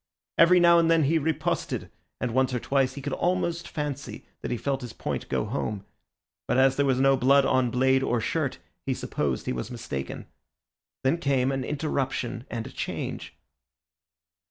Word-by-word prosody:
Every 180 +2 +7
now 170 0 +6
and 165 -1 +3
then 165 -1 +4
he 160 +4 +3
riposted, 155 0 -2 0.3
and 125 - -1
once 130 0 +2
or - - 0
twice 135 +1 +1
he 140 - -7
could 140 -1 -3
almost 170 -1 0
fancy 145 -2 -5 0.2
that - - -4
he 120 - -1
felt 135 +2 -2
his 120 -2 -7
point - - -4
go - - 0
home, 105 -4 -3 0.6
but 125 - +1
as 135 0 +5
there 140 0 +2
was 130 -1 +2
no 135 0 +5
blood 135 +2 +4
on 130 -2 +2
blade 130 +2 +3
or 120 -2 +1
shirt - - -1 0.3
he - - +1
supposed 70 -3 -2
he - - -1
was 60 - -4
mistaken. 70 - -5 0.8
Then 135 +6 +2
came 135 -3 +1
an 135 -1 -2
interruption 135 -4 -2
and 115 -2 -4
a - - -8
change. - - -5
135 Hz, 180 wpm, -27 LUFS, 125-150 Hz, 0.8 s, Every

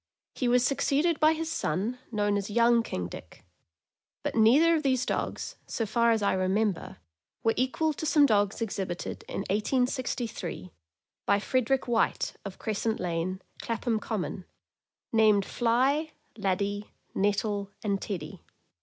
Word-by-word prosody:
He 250 - -1
was 245 0 +4
succeeded 290 +5 +1
by 310 +1 +5
his 320 0 -3
son, 210 - -1
known 205 -2 +1
as 200 0 -2
Young 235 +2 +4
King 90 - -4
Dick; 85 +1 -11 0.8
but - - -2
neither 265 +10 +5
of 320 - +2
these 260 -3 +1
dogs, - - -3
so 225 - -2
far 235 +2 +2
as 225 -2 +2
I 200 - +3
remember, 190 +1 0 0.5
were 225 - +3
equal 285 +5 +1
to 315 - -5
some 295 -2 +6
dogs 205 -2 +2
exhibited 190 -5 -4
in - - -3
1863, 230 - -2 0.6
by 200 - +5
Frederick 255 +4 0
White, 235 -2 +1
of 200 -2 -7
Crescent 220 +1 -2
Lane, 180 +2 -2 0.2
Clapham 230 -1 -1
Common, 200 -4 -4 0.7
named 215 -3 +5
Fly, 265 +7 +1 0.2
Laddie, 200 0 -2 0.2
Nettle, 205 0 0
and 200 -2 0
Teddy. 175 -2 -5
220 Hz, 135 wpm, -28 LUFS, 200-250 Hz, 0.8 s, some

